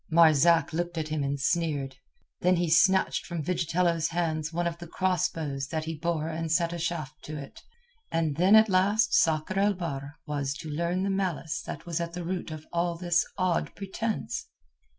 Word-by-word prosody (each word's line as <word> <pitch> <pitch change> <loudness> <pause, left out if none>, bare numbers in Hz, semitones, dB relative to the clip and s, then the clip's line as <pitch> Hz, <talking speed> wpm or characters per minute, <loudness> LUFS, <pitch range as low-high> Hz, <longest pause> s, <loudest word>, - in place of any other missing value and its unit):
Marzak 165 0 +5
looked 175 +1 -2
at 155 -1 -2
him 155 -2 -1
and 140 0 -2
sneered. 145 -4 -1 0.4
Then 180 +1 +3
he 170 -2 0
snatched 190 +3 +4
from 170 -4 -3
Vigitello's 170 0 +1
hands 160 -2 -1
one 175 +1 -1
of 170 0 -2
the 170 - -8
cross 185 0 +1
bows 140 -4 -4
that 155 +1 -3
he 165 - -3
bore 160 0 -2
and 165 0 -3
set 170 0 +2
a 170 - -4
shaft 155 -3 -4
to 155 0 -6
it. 140 -1 -9 0.5
And 160 -3 0
then 185 +6 +5
at 220 0 +7
last 205 +4 +3
Sakr 160 +4 +2
el 200 0 +3
Bahr 145 -5 -5
was 145 -2 -2
to 155 0 -7
learn 170 +4 -1
the 195 - 0
malice 185 -5 -2
that 165 +3 -6
was 170 -1 -2
at 170 0 -4
the 175 -1 -5
root 180 0 -3
of 155 -1 -8
all 170 0 0
this 175 -1 +2
odd 185 -3 0
pretence. 210 +3 -3
170 Hz, 190 wpm, -28 LUFS, 155-175 Hz, 0.5 s, at